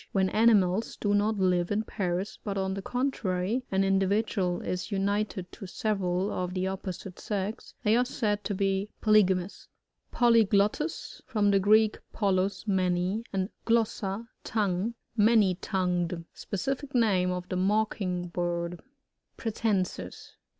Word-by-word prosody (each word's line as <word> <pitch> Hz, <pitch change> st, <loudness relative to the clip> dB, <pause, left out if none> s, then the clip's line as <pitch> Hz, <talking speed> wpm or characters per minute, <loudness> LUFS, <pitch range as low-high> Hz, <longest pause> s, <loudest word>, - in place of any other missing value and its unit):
When 190 Hz, -1 st, +2 dB
aoimaU 215 Hz, -2 st, +3 dB
do 205 Hz, -1 st, +1 dB
not 210 Hz, +1 st, +2 dB
live 180 Hz, -2 st, +2 dB
in 210 Hz, +1 st, 0 dB
pairs, 190 Hz, -1 st, -3 dB
but 200 Hz, -2 st, -3 dB
on 190 Hz, 0 st, -1 dB
the 195 Hz, -, -4 dB
contrary, 240 Hz, -2 st, -1 dB
an 195 Hz, 0 st, +2 dB
individual 195 Hz, -1 st, +1 dB
is 180 Hz, +2 st, -3 dB
united 200 Hz, -1 st, -1 dB
to 195 Hz, -, -9 dB
several 190 Hz, -1 st, -1 dB
of 180 Hz, 0 st, -3 dB
the 185 Hz, 0 st, 0 dB
opposite 190 Hz, -1 st, -5 dB
sex, 205 Hz, +1 st, -4 dB
they 215 Hz, 0 st, +4 dB
are 245 Hz, -, +4 dB
said 210 Hz, -5 st, -1 dB
to 205 Hz, -, -1 dB
be 195 Hz, +1 st, 0 dB
polygamous. 195 Hz, -4 st, +2 dB, 0.4 s
PoLYGLOTTus. 230 Hz, -, +2 dB
— -, -, -43 dB
From 210 Hz, -5 st, +2 dB
the 195 Hz, -, +4 dB
Greek, 215 Hz, +2 st, +4 dB, 0.2 s
polu$^ 195 Hz, -1 st, 0 dB
many, 185 Hz, +2 st, +1 dB
and 190 Hz, 0 st, -1 dB, 0.2 s
glossa^ 225 Hz, -2 st, 0 dB, 0.2 s
tongue. 210 Hz, +1 st, -1 dB, 0.2 s
Many.tongued. 185 Hz, -5 st, +2 dB
Specific 270 Hz, +7 st, -4 dB
name 195 Hz, -6 st, +3 dB
of 180 Hz, 0 st, -3 dB
the 185 Hz, -, -2 dB
Mocking 190 Hz, -2 st, 0 dB
bird. 175 Hz, 0 st, -2 dB, 0.6 s
Pratb.nsis. 195 Hz, -, -2 dB
195 Hz, 130 wpm, -28 LUFS, 185-215 Hz, 0.6 s, they